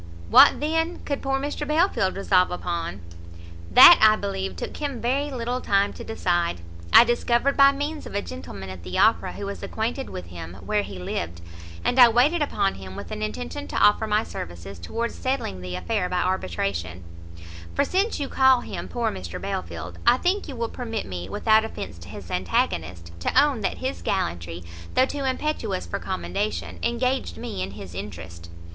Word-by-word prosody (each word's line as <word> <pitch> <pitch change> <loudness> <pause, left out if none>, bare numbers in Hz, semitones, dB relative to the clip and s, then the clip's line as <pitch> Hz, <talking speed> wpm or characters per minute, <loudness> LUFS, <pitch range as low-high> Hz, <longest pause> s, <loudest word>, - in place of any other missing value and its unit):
What, - - +8
then, 325 +3 -1
could 280 -1 -2
poor 270 0 0
Mr 290 +1 -4
Belfield 305 - +2
resolve 185 -2 +3
upon?" 170 - -4 0.7
"That, 90 - +10
I 215 0 +7
believe, 95 - -4
took 85 - -6
him 280 -5 -3
very 270 +5 0
little 250 -1 -3
time 200 0 +2
to - - -9
decide. 175 - -1 0.3
I - - +10
discovered, 240 +3 +1
by 275 0 +7
means 290 +2 -4
of - - -9
a 200 - +1
gentleman 90 +3 -8
at 95 -2 -9
the 90 +1 -5
Opera 220 +2 +3
who 200 - -6
was 200 0 -6
acquainted 235 +5 -3
with 90 - -7
him, 85 0 -8
where 105 +2 +1
he 100 -1 -8
lived, 85 -1 -4 0.4
and 255 - +2
I 245 -1 +10
waited 275 +9 +3
upon 205 -9 +1
him 95 0 -9
with 100 - -8
an - - -5
intention 95 -3 -4
to - - -7
offer 210 +1 +4
my 210 +1 +2
services 85 - -8
towards 230 - -3
settling 255 - -3
the 90 0 -5
affair 180 - -1
by 180 0 0
arbitration: 90 - -2 0.7
for - - +2
since 390 +2 0
you 280 - -2
call 265 -2 +4
him - - -6
poor 240 -1 -1
Mr 90 -3 -6
Belfield, 85 0 -5
I 245 - +7
think 370 +6 0
you 275 - -7
will 230 -1 -2
permit 225 -3 -4
me, 90 -1 -6
without 220 - +3
offence 90 - -7
to 85 +2 -12
his 95 -3 -9
antagonist, 85 -1 -1
to 85 - +2
own 285 -5 +2
that 195 - -1
his 260 +1 -4
gallantry, 85 - -2 0.3
though 255 - +5
too 280 0 -4
impetuous 260 -7 -2
for 200 - -4
commendation, 200 +2 -3
engaged 250 +3 -1
me 95 - -5
in 95 +1 -4
his 100 -3 -9
interest." 85 -3 -8
195 Hz, 185 wpm, -24 LUFS, -, 0.7 s, That